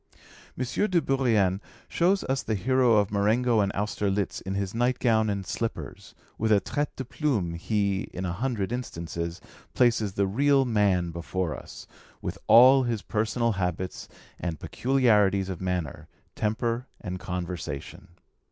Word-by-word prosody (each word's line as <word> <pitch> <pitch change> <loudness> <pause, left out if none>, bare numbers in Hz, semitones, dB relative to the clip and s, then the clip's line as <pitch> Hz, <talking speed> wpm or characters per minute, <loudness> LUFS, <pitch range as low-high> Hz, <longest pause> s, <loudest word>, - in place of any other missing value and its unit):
M. 130 - -1 0.2
de 180 - +3
Bourrienne 115 - +1 0.3
shows 185 +3 +2
us 135 +1 -1
the 110 - -2
hero 125 +4 +3
of 100 -2 +2
Marengo 110 +3 +2
and 100 -1 +2
Austerlitz 100 -1 -1
in 95 0 -4
his 100 -1 -2
night 120 +2 +1
gown 110 -2 +2
and 100 -2 -2
slippers 115 +5 -5 0.2
with 110 0 +1
a 105 - +6
'trait 145 +9 -2
de 130 - -5
plume' 115 - -1
he, 100 +3 -1
in 95 - -4
a 85 - -2
hundred 110 -1 -2
instances, 85 -7 -4 0.4
places 115 -5 +2
the 100 0 +1
real 135 +7 +3
man 100 -7 +2
before 85 0 -3
us, - - -10 0.3
with - - -5
all 130 +4 +8
his 120 -5 -2
personal 115 +2 0
habits 90 -2 -3 0.3
and 85 -4 -4
peculiarities 105 -7 +2
of 95 -2 -5
manner, 90 -6 -3 0.3
temper, 115 +3 -1
and 90 -2 -5
conversation. 90 -1 -5
105 Hz, 145 wpm, -27 LUFS, 95-120 Hz, 0.4 s, all